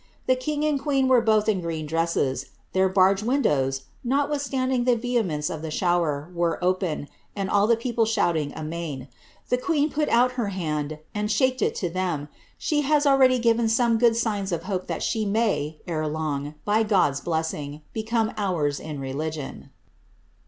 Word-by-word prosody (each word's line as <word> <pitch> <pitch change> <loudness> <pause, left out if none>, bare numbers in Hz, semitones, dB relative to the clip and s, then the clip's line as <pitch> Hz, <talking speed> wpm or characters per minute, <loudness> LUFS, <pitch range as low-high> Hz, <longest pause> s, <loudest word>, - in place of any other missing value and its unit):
The 255 - +3
king 295 +4 -2
and 300 -2 +1
queen 275 -3 +1
were 255 -2 +5
both 215 -2 +2
in 200 -4 +2
green 165 -2 -3
dresses; 150 -4 0 0.3
their 190 0 +3
barge 190 +1 +4
windows, 140 - +1 0.2
notwithstanding 265 -2 0
the 250 -1 +4
vehemence 220 -11 -1
of 160 -2 -4
the 160 - -4
shower, 165 -2 0
were 170 -1 0
open, 180 -5 0 0.3
and 195 -2 -2
all 205 0 +4
the 235 - +5
people 230 0 0
shouting 165 -9 +1
amain. 155 -4 -5 0.4
The 250 - +2
queen 295 +2 +1
put 300 0 0
out 245 +2 +4
her 245 -4 -2
hand, 155 -5 -3 0.2
and 210 0 -2
shaked 260 +2 +2
it - - +1
to 180 - -2
them. 170 -5 -2 0.3
She 300 -1 0
hath 295 +1 +2
already 265 -2 +5
given 230 -1 +2
some 230 0 +3
good 230 -1 +4
signs 205 -4 -1
of 170 -1 -2
hope 185 -1 -3
that - - -3
she 220 -2 0
may, 200 -8 0
ere 155 -3 -2
long, 150 -1 -3
by 210 +2 +3
God's 190 -10 +2
blessing, 155 -3 -3
become 225 0 0
ours 165 -8 0
in 150 -2 -6
religion." 145 +2 -5
195 Hz, 170 wpm, -25 LUFS, 155-240 Hz, 0.4 s, were